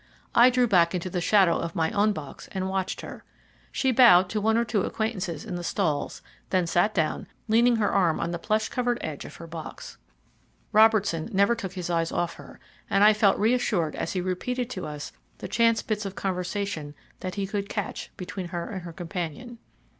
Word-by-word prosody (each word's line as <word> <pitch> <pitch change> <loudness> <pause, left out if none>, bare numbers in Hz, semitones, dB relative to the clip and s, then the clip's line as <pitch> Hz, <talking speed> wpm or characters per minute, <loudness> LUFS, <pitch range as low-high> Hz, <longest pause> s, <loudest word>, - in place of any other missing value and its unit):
I 240 +2 +7
drew 250 0 +3
back 175 -4 +3
into 180 +1 -3
the 180 - -1
shadow 190 -2 +4
of 170 0 -4
my 160 -1 +1
own 210 +1 +3
box 155 -8 -8
and 190 -1 -2
watched 190 0 -2
her. - - -9 0.5
She 265 - +1
bowed 220 -8 +7
to 215 - -1
one 220 +2 +2
or 235 - +2
two 220 -3 0
acquaintances 190 -8 -3
in - - -6
the 175 - -6
stalls, 155 -2 -1 0.3
then 185 -2 +2
sat 175 +5 +1
down, 160 -4 0 0.2
leaning 235 +2 +4
her 215 -2 +1
arm 175 -5 +2
on 170 - -2
the 175 - -3
plush 215 +4 0
covered 245 -1 -1
edge 150 -3 -5
of - - -10
her 165 - -9
box. 165 -1 -9 0.7
Robertson 215 -6 +4
never 200 +3 +3
took 195 -6 -5
his 180 -2 -4
eyes 165 -1 0
off 175 -1 -1
her, - - -13 0.3
and 195 - +3
I 215 +1 +8
felt 210 -2 +3
reassured 210 -8 +1
as - - -3
he 185 - -1
repeated 245 +7 -2
to 185 - -5
us 150 -1 -6 0.3
the - - -6
chance 230 -1 +2
bits 215 -1 -2
of 195 -1 -6
conversation 180 -4 -3 0.2
that 185 -1 -5
he 200 -1 -1
could 200 +1 -3
catch 205 - -4
between 180 0 -5
her 170 +4 -5
and 190 -3 -5
her 170 -1 -9
companion. 180 +7 -6
195 Hz, 200 wpm, -26 LUFS, 170-220 Hz, 0.7 s, I